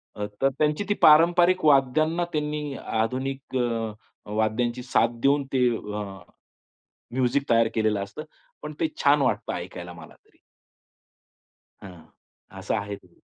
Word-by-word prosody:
अ, 105 - -3 0.2
तर 135 - +4
त्यांची 150 +5 +1
ती 205 - +4
पारंपरिक 175 +3 +5
वाद्यांना 155 +4 +3
त्यांनी 150 -2 -3
आधुनिक 130 +4 -2
अ, 115 -3 -1 0.4
वाद्यांची 115 +3 -1
साथ 120 -2 +2
देऊन 140 +1 +3
ते 125 -2 +3
अ, 105 0 -6 1.1
म्युझिक 130 +2 0
तयार 115 -1 +4
केलेलं 110 -2 +1
असतं. 100 +10 -8 0.4
पण 150 0 -7
ते 160 - +2 0.2
छान 145 +1 +5
वाटतं 120 -6 0
ऐकायला 90 0 -7
मला 85 -3 -13
तरी. - - -31 1.5
हं. 90 -5 -12 0.5
असं - - -2
आहे 100 0 -4
ते. - - -23
130 Hz, 130 wpm, -25 LUFS, 110-150 Hz, 1.5 s, पारंपरिक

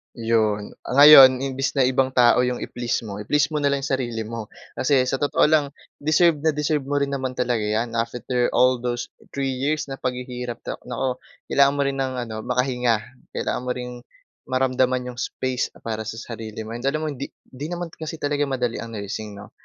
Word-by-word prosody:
'Yon. 110 -3 0 0.2
Ah, - - -2
ngayon 135 -3 +10
imbes 135 +1 -2
na 135 - +4
ibang 130 +1 +2
tao 120 -1 +6
yung 125 0 0
i-please 120 -2 -2
mo, 105 -2 -6
i-please 150 +8 +1
mo 150 - 0
na 145 - +2
lang 140 -1 0
sarili 120 -5 -2
mo. 110 -1 -6 0.2
Kasi 130 -1 +2
sa 130 +1 -1
totoo 145 - +2
lang, 150 -2 +3 0.2
deserve 155 +1 +3
na 155 0 +1
deserve 150 -2 -1
mo 145 - -1
rin 140 -1 0
naman 130 -2 -3
talaga 125 -2 0
'yan, 110 +3 -1
after 120 +1 -1
all 125 0 +4
those 120 0 -3 0.2
3 135 -1 -1
years 140 +3 -2
na 135 - -6
paghihirap, 125 -1 -4
na - - -5
nako, 125 +1 -2 0.3
kailangan 140 0 +4
mo 145 - 0
rin 140 0 -1
ng 130 -1 -1
ano, 120 -3 -4
makahinga. 125 -2 +1 0.4
Kailangan - - -2
mo 125 - +1
ring 125 0 -5 0.6
maramdaman 130 -1 +1
yung 120 - -10
space 130 +1 -2 0.2
para 110 -1 -4
sa 115 - -4
sarili 115 -1 -7
mo. 110 - -8
And 120 +3 -6
alam 155 +2 +1
mo - - -1
hindi 140 0 -5 0.2
hindi 140 +3 -6
naman 175 0 -5
kasi 160 0 -6
talaga 145 -2 -1
madali 125 -3 -2
ang 115 -1 -7
nursing 105 0 -5
'no, 105 0 -11
125 Hz, 200 wpm, -23 LUFS, 120-140 Hz, 0.6 s, ngayon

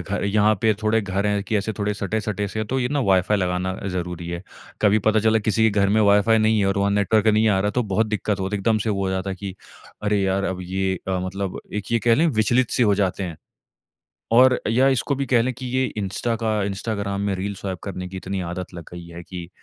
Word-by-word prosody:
घर 95 +3 -3
यहाँ 105 +1 +3
पे 110 - +4
थोड़े 110 +1 +2
घर 100 0 -2
हैं 100 -1 0
कि 110 - -1
ऐसे 105 +2 -1
थोड़े 105 0 -1
सटे-सटे 105 0 -2
से 110 +2 -3
तो 130 +5 -2
ये 125 - 0
ना 145 0 0
वाइ-फ़ाई 100 -2 +3
लगाना 90 0 -1 0.2
ज़रूरी 90 -1 -4
है, 85 +1 -5 0.4
कभी 105 +1 +5
पता 110 +1 +2
चला 110 0 +3
किसी 110 +1 0
के 100 0 +1
घर 100 - +3
में 110 +2 +3
वाइ-फ़ाई 105 +2 +4
नहीं 110 0 +3
है 100 - +2
और 100 0 0
वहाँ 100 0 +2
नेटवर्क 105 +2 +2
नहीं 110 +1 +4
आ 95 -2 +3
रहा 105 +1 +1
तो 125 - 0
बहुत 110 +1 0
दिक्कत 105 -1 -2
होती 95 +2 -1
है। - - -4
एकदम 110 +2 +2
से 110 +1 -1
वो 100 -1 -1
हो 95 - -1
जाता 95 +1 -2
है - - -3
कि 95 -2 -6 0.5
अरे 105 -1 +1
यार 95 0 0
अब 95 -1 -2
ये 95 +1 -1
अ, 95 -1 0
मतलब 95 0 -4
एक 105 +2 -4
ये 115 - +4
कह 115 +1 +3
लें 165 +6 +3
विचलित-से 120 0 +2
हो 105 -3 +4
जाते 100 0 0
हैं 85 -4 -5 1.0
और 125 +2 +6
या 125 +4 +4
इसको 135 +1 +1
भी 140 - -2
कह 125 -3 +3
लें 130 +2 -1
कि 130 +1 -8
ये 130 +1 0
इंस्टा 105 +4 -2
का, 110 -2 -1
इंस्टाग्राम 100 0 -3
में 100 -1 0
रील 100 +2 -3
स्वाइप 95 -2 -5
करने 90 -2 -5
की 95 +1 -7
इतनी 95 +1 -4
आदत 90 +1 -5
लग 85 -2 -8
गई 85 -1 -9
है 85 0 -9
कि 90 -1 -8
100 Hz, 250 wpm, -23 LUFS, 95-110 Hz, 1.0 s, और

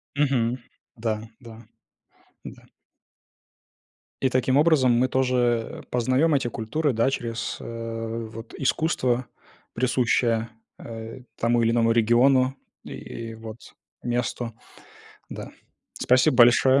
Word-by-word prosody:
Мгм. 130 -4 +1 0.4
Да-да, 110 0 -6 0.8
да. - - -10 1.6
И 130 - +2
таким 130 +1 +1
образом 150 -5 +4
мы 125 +2 +3
тоже, 130 0 0
э, 120 -2 0
познаем 130 +6 +2
эти 135 -3 0
культуры, 130 +6 -1
да, 115 +4 +2
через, 115 -4 -4
э, 115 0 -5
вот 115 +1 -10
искусство, 130 -4 0 0.5
присущее, 120 -2 +1 0.3
э, 115 +2 -8 0.2
тому 120 0 +2
или 115 - +3
иному 115 -1 +3
региону 130 +3 +3 0.3
и - - -10
и 115 -1 -7
вот 110 0 -9 0.5
месту. 120 -1 -2 0.8
Да. - - -8 0.4
Спасибо 125 0 +3
большое. 130 +3 +6
120 Hz, 105 wpm, -25 LUFS, 115-130 Hz, 1.6 s, большое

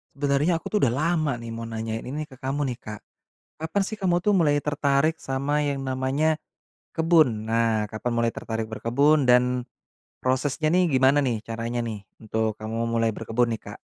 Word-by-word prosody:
Sebenarnya 145 +4 +1
aku - - -6
tuh 210 - +2
udah 120 -3 +3
lama 155 +1 +1
nih 115 -1 -8
mau 115 0 -5
nanyain 115 0 -4
ini 150 +4 -3
ke 130 - -14
kamu 135 +2 -2
nih, 120 - -6
Kak. 105 -2 -8 0.6
Kapan 160 +5 0
sih 220 - -5
kamu 185 -4 +1
tuh 210 +3 +2
mulai 150 -4 +3
tertarik 145 +2 +1
sama 140 +3 -1
yang 140 -1 -1
namanya 135 +4 +1 0.6
kebun? 155 -10 +3
Nah, 115 -1 +2
kapan 110 +4 -3
mulai 115 0 +1
tertarik 110 -1 -4
berkebun, 140 +6 +2
dan 125 0 +4 0.6
prosesnya 130 +4 0
nih 180 0 +4
gimana 130 +2 +4
nih 115 -5 -1
caranya 115 +1 -3
nih, 110 -3 -4 0.2
untuk 110 0 -1
kamu 115 +2 -2
mulai 115 -1 +1
berkebun 115 +3 0
nih, 110 - -4
Kak? - - -9
130 Hz, 175 wpm, -25 LUFS, 115-150 Hz, 0.6 s, dan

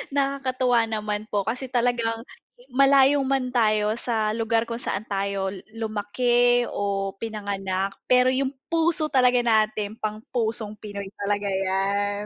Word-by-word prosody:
Nakakatuwa 260 -4 +1
naman 210 -1 -3
po 200 -1 0
kasi 255 +4 -3
talagang, 235 -2 0 0.5
malayo 275 +1 +5
man 265 -1 0
tayo 215 -2 +2
sa 220 -3 -1
lugar 225 0 +1
kung 230 - -3
saan 195 +2 -3
tayo 195 -1 -1 0.2
lumaki 240 +3 +1
o 200 -1 -2
pinanganak 195 -3 -3
pero 250 0 +4
yung 265 +1 0 0.2
puso 325 -2 +2
talaga 250 -2 +4
natin 215 -2 +1
pang 215 0 -4
pusong 220 -3 -2
Pinoy 200 -2 -7
talaga 205 0 -1
yan. 195 +2 0
220 Hz, 125 wpm, -24 LUFS, 205-250 Hz, 0.5 s, malayo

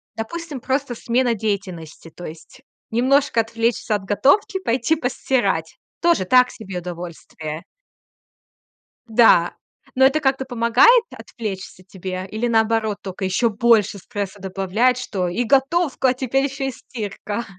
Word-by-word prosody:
Допустим, 300 +5 -5
просто 265 -1 -1
смена 240 +1 +1
деятельности, 190 -7 -4
то 175 +2 -11
есть 160 +11 -11 0.3
немножко 255 +1 +2
отвлечься 230 0 -1
от 205 - -4
готовки, 285 - +2
пойти 255 -2 +1
постирать, 245 - -1 0.2
тоже 335 - +3
так 250 +4 +5
себе 195 -5 -7
удовольствие? 170 -2 -7 1.5
Да. 220 -7 +5 0.4
Но 265 - +5
это 290 +3 +2
как-то 270 -2 +1
помогает 245 - +5
отвлечься 195 -5 -7
тебе, 185 0 -6
или 220 +3 -2
наоборот 220 -2 +1
только 190 0 -6
ещё 210 +5 +1
больше 215 -2 +3
стресса 200 0 -6
добавляет, 195 +6 +1
что 195 -8 -3
и 205 +8 -1
готовка, 275 +3 +2
а - - 0
теперь 265 +1 0
ещё 275 0 -3
и 270 - 0
стирка? 220 -2 -6
230 Hz, 130 wpm, -21 LUFS, 195-260 Hz, 1.5 s, так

